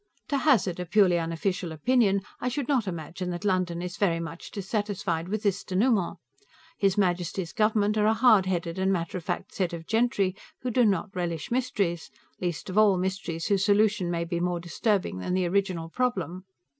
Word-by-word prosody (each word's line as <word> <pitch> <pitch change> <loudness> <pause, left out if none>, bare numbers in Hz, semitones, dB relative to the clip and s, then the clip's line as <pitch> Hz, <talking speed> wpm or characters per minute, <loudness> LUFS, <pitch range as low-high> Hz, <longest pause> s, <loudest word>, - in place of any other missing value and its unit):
To 285 - +1
hazard 225 - +2
a 180 - -4
purely 185 -2 +4
unofficial 165 +2 -2
opinion, 200 - +2 0.2
I 250 - -1
should 260 0 -3
not 255 -8 +1
imagine 175 +1 -4
that 175 +3 -4
London 180 -3 0
is 180 0 -5
very 170 -5 +2
much 165 0 -7
dissatisfied 195 -4 -2
with 215 +1 -2
this 200 -2 0
dénouement. 195 -1 +1 0.6
His 195 0 +2
Majesty's 180 -2 0
government 215 0 +2
are 210 - +3
a 220 - +3
hard 220 -5 +5
headed 175 -1 -2
and 190 +1 +2
matter 180 0 -2
of - - -14
fact 175 +1 -4
set 185 -2 -1
of 165 -1 -6
gentry 220 -4 +1 0.3
who 250 - -1
do 245 +1 +4
not 200 0 0
relish 170 -2 -3
mysteries, 205 -9 -1 0.3
least 175 -3 -3
of 190 +3 +1
all 205 -3 +5
mysteries 180 -3 -3
whose 195 -2 +2
solution 205 -3 +3
may 170 -1 -1
be 170 0 -2
more 175 0 0
disturbing 180 - -1
than 180 - -2
the 185 -1 +1
original 185 -3 0
problem. 190 -5 -2
190 Hz, 185 wpm, -27 LUFS, 175-210 Hz, 0.6 s, hard